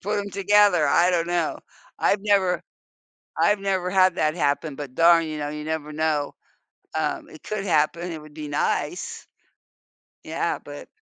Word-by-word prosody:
Put 210 +2 -1
'em 200 0 -4
together, 200 -3 +4
I 175 +5 +4
don't 170 -2 +1
know. 175 -2 -1 0.4
I've 200 - +2
never 195 -3 +2 0.8
I've 205 0 +3
never 190 -2 -1
had 185 -1 +4
that 155 0 +1
happen 145 -1 0
but 135 -2 -8
darn, 165 +1 +5
you 155 -1 -5
know, 145 -1 -3
you 150 0 -6
never 155 -1 -4
know. 150 -2 -1 0.6
Um, - - -2
it 155 - -14
could 210 -2 -4
happen, 170 +1 +1
it 160 -2 -7
would 155 0 -14
be 150 -1 -7
nice. 460 - -2 1.0
Yeah, - - -2
but - - -10
170 Hz, 165 wpm, -24 LUFS, 150-195 Hz, 1.0 s, darn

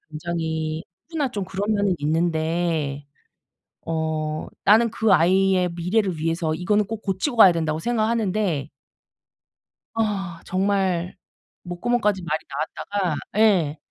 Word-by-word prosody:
굉장히 160 0 -3 0.3
누구나 300 -5 -1
좀 205 -4 -3
그런 200 +3 -2
면은 200 -2 +2
있는데 160 -2 0 0.8
어 155 -1 -2 0.2
나는 225 +3 +5
그 220 -2 +2
아이의 185 +1 +3
미래를 180 +1 0
위해서 165 0 -1
이거는 205 +5 +1
꼭 220 +1 -6
고치고 195 +8 -2
가야 195 -5 +9
된다고 160 -2 -1
생각하는데 215 - 0 1.3
아 195 -6 -2
정말 190 -2 0 0.5
목구멍까지 210 +2 0
말이 155 -1 -1
나왔다가. 175 +4 -2 0.2
예. 185 -9 +3
180 Hz, 255 characters per minute, -23 LUFS, 160-205 Hz, 1.3 s, 가야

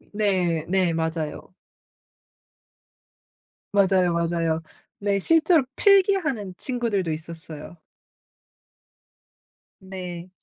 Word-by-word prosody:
네. 180 -6 +1
네. 185 -2 +2
맞아요. 160 0 -3 2.2
맞아요, 190 -3 +3
맞아요. 165 -1 0 0.4
근데 200 0 0
실제로 320 - +4
필기하는 370 - +3
친구들도 225 -9 -1
있었어요. 160 0 -7 2.1
네. 180 -2 -7
185 Hz, 165 characters per minute, -24 LUFS, 165-210 Hz, 2.2 s, 실제로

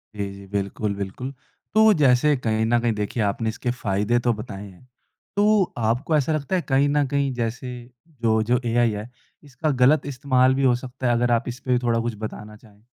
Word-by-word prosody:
जी 100 -1 -2
जी, 100 0 -11
बिल्कुल 100 +1 -2
बिल्कुल। 100 +7 -5 0.4
तो 220 0 +6
जैसे 140 +2 +4
कहीं 110 -2 0
न 120 +1 +2
कहीं 120 -2 +1
देखिए 105 +2 -2
आपने 110 +3 -1
इसके 120 +2 -3
फ़ायदे 105 0 0
तो 120 - +4
बताएँ 105 -2 -8
हैं। 110 +8 -20 0.5
तो 210 0 +4
आपको 120 +7 0
ऐसा 150 +2 0
लगता 155 +4 -1
है, 180 - +1
कहीं 140 0 +2
न 145 0 +2
कहीं 140 0 0
जैसे 125 +1 -3 0.5
जो 110 -1 +2
जो, 120 +2 +1
एआई 120 -1 +2
है, 105 +3 -6 0.3
इसका 145 +2 -3
गलत 140 +3 +4
इस्तेमाल 130 -1 +2
भी 135 - 0
हो 125 -2 +4
सकता 125 +1 -5
है 120 - +3
अगर 120 0 +1
आप 115 0 +1
इस 125 +1 -5
पे 125 -2 +1
थोड़ा 120 -2 +1
कुछ 115 -1 -3
बताना 105 0 -7
चाहें? 105 -1 -21
120 Hz, 205 wpm, -23 LUFS, 110-135 Hz, 0.5 s, तो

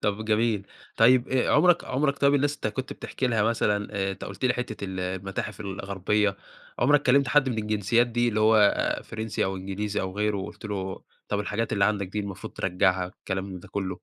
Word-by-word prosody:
طب 105 +1 -1
جميل. 110 -2 +1 0.3
طيب، 125 +2 +5
آآ، 130 -1 +1
عُمرك 175 -2 +4
عُمرك 140 +2 0
طيب 140 0 +4
الناس 145 +1 +2
أنت - - -4
كنت 125 +5 -4
بتحكِ - - -10
لها 115 -4 +2
مثلًا 105 -2 +1
آآ، 95 -1 -1
أنت - - -8
قُلت - - -6
لي 125 - +3
حتة 110 -5 -4
ال 95 -1 -4
المتاحف 95 +3 -4
الغربية، 100 +1 -1 0.4
عُمرك 145 +3 +4
كلمت 135 +1 +4
حد 135 0 +4
من 115 -3 -2
الجنسيات 105 +2 +2
دي 120 0 +1
اللي 110 -1 0
هو 110 +1 +5
آآ، 105 -1 +3
فرنسي 110 -1 -3
أو 95 0 -2
إنجليزي 100 +2 -3
أو 95 +1 -5
غيره 105 0 +1
وقُلت 95 +2 -7
له 95 -3 -4 0.3
طب 105 0 0
الحاجات 105 +2 -2
اللي 100 -1 +3
عندك 100 -2 +1
دي 105 +3 -3
المفروض 100 -2 -7
ترجعّها 90 0 0
كلام 95 0 -2
من 95 -2 -7
ده - - -14
كلّه؟ 95 -2 -3
105 Hz, 205 wpm, -26 LUFS, 95-120 Hz, 0.4 s, طيب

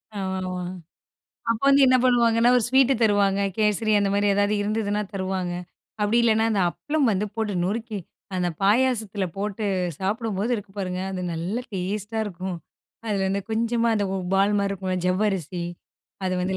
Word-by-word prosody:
ஆ, - - -4 1.3
அப்ப 230 -1 0
வந்து 275 0 +6
என்ன 255 0 +6
பண்ணுவாங்கன்னா, 235 -1 +4
ஒரு 245 - +3
ஸ்வீட் 265 +1 +5
தருவாங்க. 200 -2 +3 0.2
கேசரி, 215 0 +2
அந்த 200 -1 +1
மாரி 205 0 +2
ஏதாவது 205 +1 +2
இருந்ததுனா 210 0 -1
தருவாங்க. 185 -2 -2 0.5
அப்படி 210 +3 +2
இல்லைனா, 225 -1 +3
அந்த 205 -3 +1
அப்பளம் 295 - 0
வந்து 200 +2 0
போட்டு 220 -3 -1
நொறுக்கி, 220 +2 -2 0.4
அந்த 180 -1 +1
பாயாசத்துல 215 -2 +2
போட்டு 210 +2 -3 0.4
சாப்பிடும்போது 210 +2 -1
இருக்கு 205 -2 -9
பாருங்க 185 -2 -2
அது 185 - -4
நல்ல 170 +7 -2
டேஸ்ட்டா 205 +4 -3
இருக்கும். 185 -2 -5 0.5
அதில 200 -3 0
வந்து 195 +1 0
கொஞ்சமா 230 +1 +1
அந்த 205 - +1 0.3
பால் 200 +2 +3
மாரி 200 0 0
இருக்கும்ல 190 -1 -2
ஜவ்வரிசி, 185 -2 0 0.6
அதை 185 - 0
வந்து 190 +1 -1
205 Hz, 150 wpm, -24 LUFS, 190-225 Hz, 1.3 s, வந்து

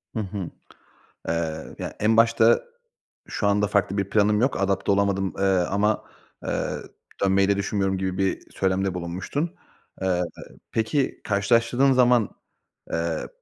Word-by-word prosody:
Hı - - -1
hı. 100 -3 -4 0.8
Eee, 80 -1 -3
ya, - - -5
en 110 +1 +3
başta, 115 0 +5 0.6
şu 100 - -1
anda 105 +1 +2
farklı 100 0 +1
bir 100 0 -1
planım 105 0 +3
yok. 125 -6 +1
Adapte 95 0 +1
olamadım, 100 -1 +1
eee, 95 - -1
ama, 100 +3 +2 0.4
eee, - - -1 0.5
dönmeyi 95 0 +3
de 100 - +3
düşünmüyorum 95 -1 0
gibi 95 0 -2
bir 95 -1 0
söylemde 95 0 0
bulunmuştun. 90 - -3 0.5
Eee, 90 -2 +1 0.5
peki, 115 +5 0
karşılaştırdığın 115 +5 +3
zaman, 125 -4 +4 0.6
eee, 85 -1 -1
100 Hz, 130 wpm, -24 LUFS, 95-110 Hz, 0.8 s, başta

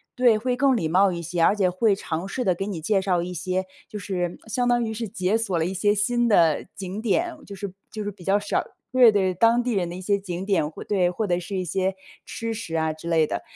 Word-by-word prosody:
对， 245 -4 +4
会 250 +3 -1
更 265 -1 +3
礼 160 - -1
貌 190 +3 +4
一 170 -1 -5
些， 170 +1 -2
而 200 - +5
且 195 -3 +2
会 200 +2 +2
尝 170 0 -4
试 250 +5 -3
地 185 - +3
给 195 +3 -4
你 185 -6 -4
介 195 +4 +1
绍 180 -3 +1
一 180 0 -5
些， 185 +2 -2 0.2
就 210 - -6
是 180 -3 -3
相 245 +3 -1
当 240 -1 +3
于 220 - -3
是 225 0 -4
解 185 +3 0
锁 210 -6 0
了 160 - +1
一 185 - -2
些 205 +3 +2
新 240 +4 +1
的 165 -8 +3
景 195 +2 -5
点， 325 - 0
就 200 - -8
是 195 -1 -6 0.2
就 215 -1 -5
是 205 - -3
比 185 -2 -15
较 195 +2 +3
少 205 - -1 0.3
对 250 -3 +7
对， 190 -3 +1
当 235 +4 +3
地 250 - -1
人 180 -4 0
的 175 - -6
一 185 - -7
些 200 +1 +1
景 185 -1 -5
点， 165 -7 +1
会 - - -9
对， 185 -4 +2
或 215 +4 -2
者 175 -2 0
是 195 +3 -6
一 185 -1 -1
些 190 +3 -1 0.3
吃 230 0 -4
食 170 -7 -5
啊 160 -1 0
之 155 +2 -10
类 160 -2 +4
的。 - - -3
195 Hz, 285 characters per minute, -24 LUFS, 180-220 Hz, 0.3 s, 对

